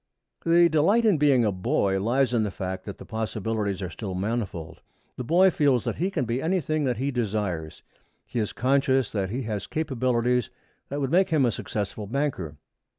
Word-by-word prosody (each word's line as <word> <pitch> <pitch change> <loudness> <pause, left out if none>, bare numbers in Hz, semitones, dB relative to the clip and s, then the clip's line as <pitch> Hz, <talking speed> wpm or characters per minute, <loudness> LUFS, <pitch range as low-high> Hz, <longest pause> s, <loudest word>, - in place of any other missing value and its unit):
The 170 +1 +5
delight 170 +9 +3
in 200 -8 +4
being 135 -5 +4
a 105 - +2
boy 95 +1 0
lies 125 +4 +1
in 115 - +3
the 105 - 0
fact 95 0 -5
that 100 - -7
the - - -11
possibilities 110 -3 -2
are 90 - -4
still 95 -5 -5
manifold. 95 -5 -3 0.3
The 125 - -5
boy 180 +9 +4
feels 140 -7 +2
that - - -3
he 180 +3 0
can 160 -10 -1
be 120 +3 -1
anything 155 -3 0
that 125 -3 0
he 135 +4 -1
desires. 100 - -3 0.4
He 120 - -3
is 105 - -1
conscious 135 -1 +2
that 95 -3 -1
he 125 +6 -3
has 105 -3 -4
capacities 125 -5 0 0.4
that 145 +1 -3
would 135 -1 -1
make 190 +3 +4
him 155 -5 +3
a 120 - +2
successful 105 0 -4
banker. 115 - -2
120 Hz, 190 wpm, -26 LUFS, 105-145 Hz, 0.4 s, The